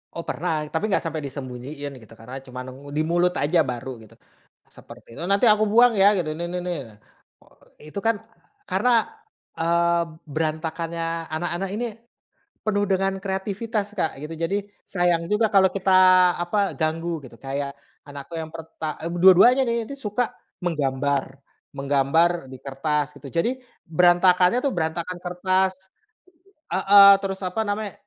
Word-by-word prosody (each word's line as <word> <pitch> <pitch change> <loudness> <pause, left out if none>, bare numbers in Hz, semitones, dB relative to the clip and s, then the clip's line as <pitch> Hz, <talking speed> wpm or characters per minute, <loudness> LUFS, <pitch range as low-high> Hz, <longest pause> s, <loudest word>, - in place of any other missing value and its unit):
Oh 170 - -3
pernah 175 +2 -2 0.2
tapi 160 +6 0
enggak 195 - +2
sampai 160 -1 -3
disembunyiin 140 +1 -7
gitu 110 0 -16
karena 125 +4 -8
cuman 125 0 -7
nengu 135 +2 -12
di - - +3
mulut 175 +1 +2
aja 160 +4 +2
baru 125 0 -5
gitu, 110 - -17 0.6
seperti - - -14
itu, - - -7
"Nanti 200 +4 +3
aku 215 0 +4
buang 240 +1 +6
ya!" 195 - +7
gitu 170 -4 -1
nih 170 - -3
nih 180 - -2
nih. 180 -1 -2 1.1
Itu 175 - -10
kan 225 0 +3 0.5
karena, 250 - +2 0.7
eee, 170 +1 +2 0.3
berantakannya 160 +2 -3 0.3
anak-anak 175 +3 -3
ini, 240 +3 -2 0.8
penuh 205 -1 +1
dengan 195 0 +1
kreativitas 205 +2 -3
Kak 160 - -1
gitu, 160 +2 -6
jadi 170 +4 0 0.3
sayang 175 -2 +1
juga 215 +2 +3
kalau 190 -1 +6
kita 190 -1 0 0.5
apa 195 +3 0
ganggu 165 +1 -1
gitu 120 -2 -12
kayak 140 +1 -4 0.4
anakku 140 +2 -10
yang 160 - -6
perta 160 -1 -6
eee, 170 - -3
dua-duanya 195 +8 +7
nih, 235 -1 0
dia 280 - -7
suka 225 +1 -2 0.3
menggambar 140 -4 0 0.5
menggambar 140 +4 +2 0.2
di - - -7
kertas 150 +2 -2
gitu 140 - -10
jadi, 170 +8 +1 0.4
berantakannya 180 +4 +4
tuh 275 - +1
berantakan 170 +2 -2
kertas. 185 +1 0 0.8
Heeh, 200 +1 +8
terus 195 0 -3
apa 185 +4 -1
namanya 205 0 -3
170 Hz, 145 wpm, -23 LUFS, 150-195 Hz, 1.1 s, Heeh